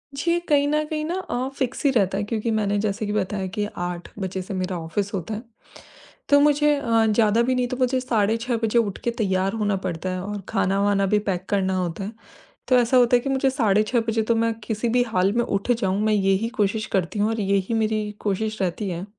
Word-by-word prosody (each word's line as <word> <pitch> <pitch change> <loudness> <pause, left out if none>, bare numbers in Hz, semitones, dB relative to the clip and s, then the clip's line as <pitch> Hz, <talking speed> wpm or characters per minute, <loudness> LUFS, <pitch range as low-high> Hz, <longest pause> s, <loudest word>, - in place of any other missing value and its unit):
जी, 340 +4 +1
कहीं 290 -4 +2
न 305 +1 +1
कहीं 305 -1 -3
ना 345 +3 -2
अ, 255 -7 -3
फ़िक्स 260 +2 -2
ही - - +6
रहता 195 -5 +1
है, 205 - -1
क्योंकि 225 +1 -2
मैंने 205 -2 +1
जैसे 210 +1 -1
कि 205 - -3
बताया 195 -1 -1
कि 210 0 0
8 175 0 -4
बजे 190 0 -3
से 190 - -7
मेरा 185 -1 -2
ऑफ़िस 195 +5 -3
होता 195 +3 -3
है। 215 - -4 0.9
तो 285 0 +6
मुझे 295 0 +4
अ, 230 -5 +2
ज़्यादा 220 +1 +3
भी 255 +2 +1
नहीं, 250 -1 +1
तो 255 - -4
मुझे 255 0 +1
साढ़े 225 -3 +1
6 235 0 -2
बजे 225 +2 +3
उठ 205 -4 -1
के 235 - 0
तैयार 190 -1 +1
होना 205 -3 0
पड़ता 175 +1 -3
है 185 0 -3
और 205 0 -5
खाना-वाना 200 +1 +1
भी 210 +2 +2
पैक 180 0 -2
करना 190 -2 +1
होता 180 +1 -3
है। 205 - -5 0.6
तो 255 - +4
ऐसा 245 +2 +3
होता 245 0 +5
है - - +5
कि 275 - -4
मुझे 270 0 +2
साढ़े 215 -5 +2
6 235 +3 +1
बजे 225 0 +1
तो 230 +1 +1
मैं 230 0 +1
किसी 220 +2 -2
भी 245 +1 +3
हाल 195 -4 +1
में 235 +1 +2
उठ 200 +5 -1
जाऊँ, 195 -4 0
मैं 215 0 +2
यही 195 +2 +2
कोशिश 210 +2 +1
करती 190 +3 -1
हूँ 210 +2 +2
और 225 - -2
यही 200 +1 0
मेरी 215 -1 0
कोशिश 215 +1 -2
रहती 190 +2 -1
है। 175 +1 -4
215 Hz, 235 wpm, -23 LUFS, 195-240 Hz, 0.9 s, ही